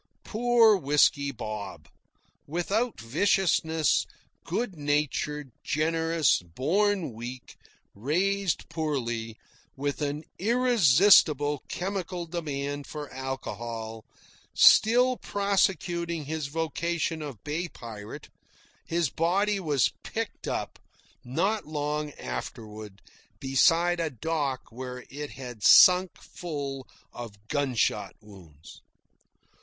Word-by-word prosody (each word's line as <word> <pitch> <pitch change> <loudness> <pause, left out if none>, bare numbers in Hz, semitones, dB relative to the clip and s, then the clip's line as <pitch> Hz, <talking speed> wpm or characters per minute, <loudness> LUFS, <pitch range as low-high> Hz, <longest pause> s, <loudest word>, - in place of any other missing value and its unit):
(Poor 230 -1 +4
Whisky 140 -2 +2
Bob! 110 -4 -7 0.6
without 200 +9 -1
viciousness, 160 - +1 0.4
good 235 -6 -3
natured, 150 -1 -1
generous, 160 - +1
born 165 - 0
weak, 120 +3 -8 0.4
raised 180 - 0
poorly, 120 -8 -3 0.4
with 140 +2 -3
an 145 +1 -2 0.2
irresistible 185 - +4
chemical 185 -2 -4
demand 145 -4 -4
for 150 -3 -7
alcohol, 115 -4 -5 0.5
still 250 +3 +6
prosecuting 175 -5 0
his 155 0 -3
vocation 165 +1 -2
of 140 -9 -8
bay 160 +4 -2
pirate, 110 -8 -9 0.6
his 165 -4 0
body 195 +5 +1
was 150 -8 +1
picked - - -5
up, - - -4 0.4
not 195 - -1
long 150 0 -2
afterward, 105 - -7 0.4
beside 165 +6 +3
a 165 -1 0
dock 140 0 -2
where 125 +1 -7
it 145 +1 -6
had 125 -4 -9
sunk 180 0 +7
full 140 -6 -6 0.3
of 110 -3 -10
gunshot 135 -5 0
wounds.) 85 -8 -15
150 Hz, 90 wpm, -27 LUFS, 130-175 Hz, 0.6 s, sunk